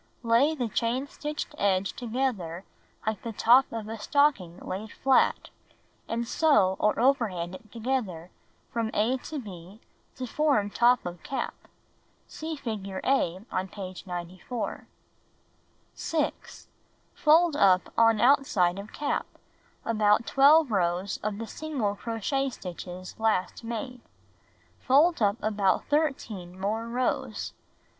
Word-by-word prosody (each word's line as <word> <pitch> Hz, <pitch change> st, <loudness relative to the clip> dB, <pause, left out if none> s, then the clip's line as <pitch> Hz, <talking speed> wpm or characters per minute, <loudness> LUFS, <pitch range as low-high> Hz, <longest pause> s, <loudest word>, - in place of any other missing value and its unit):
Lay 240 Hz, +7 st, +3 dB
the 250 Hz, -5 st, -1 dB
chain 235 Hz, +4 st, -1 dB
stitched 300 Hz, +1 st, -5 dB
edge 195 Hz, -1 st, +1 dB
together 220 Hz, -8 st, -3 dB, 0.4 s
like 215 Hz, -2 st, -1 dB
the 230 Hz, -, -5 dB
top 245 Hz, +5 st, +5 dB
of 225 Hz, -2 st, -5 dB
a 225 Hz, 0 st, -6 dB
stocking 210 Hz, -, +2 dB
laid 205 Hz, +3 st, -6 dB
flat, 265 Hz, -1 st, +2 dB, 0.6 s
and 235 Hz, +1 st, -2 dB
sew 215 Hz, -, +3 dB
or 210 Hz, -, +2 dB
overhand 220 Hz, -10 st, +1 dB
it 215 Hz, +3 st, -12 dB
together 220 Hz, -8 st, -3 dB, 0.4 s
from 230 Hz, -1 st, -1 dB
a 230 Hz, +5 st, +2 dB
to 300 Hz, +4 st, -7 dB
b 195 Hz, -4 st, -9 dB, 0.4 s
to 255 Hz, -, -4 dB
form 255 Hz, -6 st, +1 dB
top 245 Hz, +3 st, +3 dB
of 175 Hz, -1 st, -6 dB
cap. 270 Hz, -, -3 dB, 0.7 s
(See 315 Hz, 0 st, -6 dB
figure 200 Hz, -8 st, -5 dB
A 190 Hz, -9 st, +1 dB
on 185 Hz, +1 st, -1 dB
page 185 Hz, -1 st, -8 dB
94). 180 Hz, +6 st, -5 dB, 1.1 s
6. 310 Hz, -2 st, -3 dB, 0.5 s
Fold 320 Hz, +1 st, +4 dB
up 185 Hz, -9 st, +3 dB
on 225 Hz, -1 st, +4 dB
outside 230 Hz, -9 st, +3 dB
of 200 Hz, +2 st, -9 dB
cap, 290 Hz, -, -2 dB, 0.6 s
about 215 Hz, 0 st, +3 dB
12 285 Hz, 0 st, +5 dB
rows 180 Hz, 0 st, 0 dB
of 210 Hz, -1 st, -2 dB
the 230 Hz, -, -4 dB
single 265 Hz, -6 st, -2 dB
crochet 235 Hz, +6 st, -2 dB
stitches 180 Hz, -4 st, -8 dB
last 220 Hz, -1 st, 0 dB
made. 235 Hz, +2 st, -5 dB, 0.8 s
Fold 295 Hz, +4 st, +4 dB
up 205 Hz, 0 st, +3 dB
about 205 Hz, -3 st, +1 dB
13 225 Hz, -, -1 dB
more 220 Hz, +4 st, -2 dB
rows. 250 Hz, +2 st, -2 dB
225 Hz, 125 wpm, -27 LUFS, 190-265 Hz, 1.1 s, top